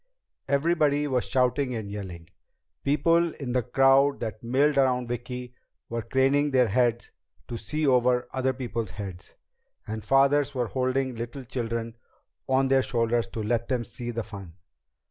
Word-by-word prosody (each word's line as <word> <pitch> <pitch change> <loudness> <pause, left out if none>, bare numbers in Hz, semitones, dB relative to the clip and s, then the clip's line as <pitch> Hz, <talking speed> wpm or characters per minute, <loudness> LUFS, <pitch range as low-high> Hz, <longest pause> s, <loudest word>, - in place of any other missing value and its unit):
Everybody 145 0 +2
was 130 -4 0
shouting 125 0 +1
and 105 -3 -5
yelling. 90 -5 -7 0.6
People 165 +4 +2
in 135 -4 -5
the 125 0 +2
crowd 135 +3 +4
that 110 -1 -5
milled 140 +4 +2
around 125 -2 +2
Vicki 125 +1 -5 0.4
were 115 0 -2
craning 135 +5 +2
their 130 -4 +3
heads 120 +2 +1 0.4
to 120 - -5
see 150 +8 -2
over 125 -2 +3
other 130 0 +1
people's 120 -4 -4
heads, 95 -2 -8 0.5
and 110 0 -5
fathers 140 +3 +3
were 120 -3 -1
holding 130 0 0
little 120 +4 -6
children 115 -1 -4 0.5
on 130 0 +3
their 135 0 +4
shoulders 120 -2 0
to 110 - -5
let 115 +2 0
them 125 -3 0
see 120 +1 -7
the 115 -1 -3
fun. 95 -6 -10
125 Hz, 150 wpm, -26 LUFS, 115-135 Hz, 0.6 s, crowd